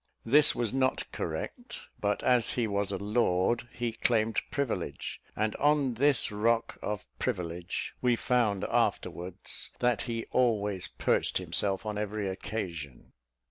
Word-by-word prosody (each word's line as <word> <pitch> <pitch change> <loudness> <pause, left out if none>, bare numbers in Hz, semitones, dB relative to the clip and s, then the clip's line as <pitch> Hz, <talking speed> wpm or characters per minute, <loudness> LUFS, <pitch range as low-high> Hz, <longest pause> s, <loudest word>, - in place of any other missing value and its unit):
This 145 +5 +7
was 120 -2 -1
not 130 -1 +1
correct, 85 - -5 0.2
but 105 0 0
as 120 -4 +4
he 120 - +2
was 100 -1 -1
a - - -1
lord, 105 +1 +1
he 120 -1 -2
claimed 110 -1 +1
privilege, 125 -11 -3
and 110 0 0
on 145 -3 +3
this 135 0 +2
rock 115 +2 +1
of 105 -1 -3
privilege 85 0 -3
we 125 -1 +3
found 115 -5 +1
afterwards 90 +1 -1
that 120 -3 +2
he 115 -1 -2
always 105 -6 +1
perched - - +1
himself 100 +1 -1
on 105 -1 -2
every 105 -1 -2
occasion. 85 - -5
110 Hz, 135 wpm, -30 LUFS, 100-120 Hz, 0.2 s, This